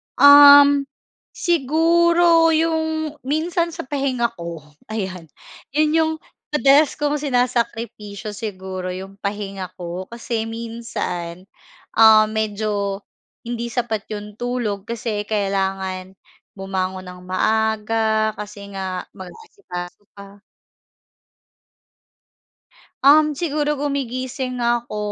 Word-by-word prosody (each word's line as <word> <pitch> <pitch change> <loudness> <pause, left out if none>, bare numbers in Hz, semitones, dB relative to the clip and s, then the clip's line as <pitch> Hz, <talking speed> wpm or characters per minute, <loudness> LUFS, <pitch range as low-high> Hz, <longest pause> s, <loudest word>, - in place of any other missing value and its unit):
Um, 285 0 +8 0.5
siguro 335 +1 +3
yung 315 -1 -1
minsan 335 +3 0
sa - - -5
pahinga 260 -4 -1
ko, 170 -3 -7 0.2
ayan. 190 -6 -5 0.5
'Yon 305 0 +3
yung 320 0 +2 0.4
madalas 280 +1 +4
kong 295 0 -1
sinasakripisyo 235 -5 -2
siguro 190 -3 -6
yung 195 +1 -9
pahinga 200 -2 -4
ko. 180 +1 -6
Kasi 230 -1 -4
minsan, 225 -7 -5 0.5
um, 220 -1 +8
medyo 205 -2 -2 0.4
hindi 235 0 -4
sapat 225 -3 -3
yung 210 +1 -8
tulog 235 -5 -3
kasi 220 -3 -3
kailangan 190 -2 -2 0.4
bumangon 190 -1 -3
nang 180 0 -10
maaga 220 +2 +1
kasi 205 -1 -8
nga 185 -1 -4
mag-aasikaso 190 - -9
pa. 200 0 -13 2.7
Um, 300 0 +6
siguro 300 -3 -1
gumigising 260 -2 -3
ako 240 -2 -1
225 Hz, 90 wpm, -21 LUFS, 200-285 Hz, 2.7 s, Um